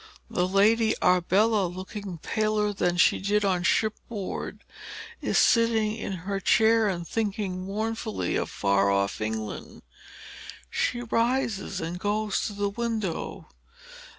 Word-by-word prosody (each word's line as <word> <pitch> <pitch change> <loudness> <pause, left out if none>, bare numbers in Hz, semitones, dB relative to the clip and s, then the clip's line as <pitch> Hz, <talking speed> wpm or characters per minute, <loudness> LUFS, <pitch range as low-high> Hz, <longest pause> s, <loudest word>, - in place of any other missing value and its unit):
The 180 - +1
Lady 215 +4 +3
Arbella, 190 +3 +3
looking 185 +1 -7
paler 215 +3 0
than 175 -3 0
she - - +4
did 205 +1 +1
on 185 -2 +1
shipboard, 215 +2 -2 0.6
is - - 0
sitting 225 -2 +3
in 220 - -5
her 195 0 -2
chair, 220 +2 +4
and 175 -4 -3
thinking 200 -4 -2
mournfully 220 - -2
of - - -1
far 100 0 +2
off 100 +1 0
England. 110 0 -5 0.9
She 240 - 0
rises 230 -4 0
and 170 +2 -4
goes 210 +1 -1
to 210 - -6
the 205 0 -1
window. 220 -5 -3
205 Hz, 125 wpm, -26 LUFS, 180-220 Hz, 0.9 s, she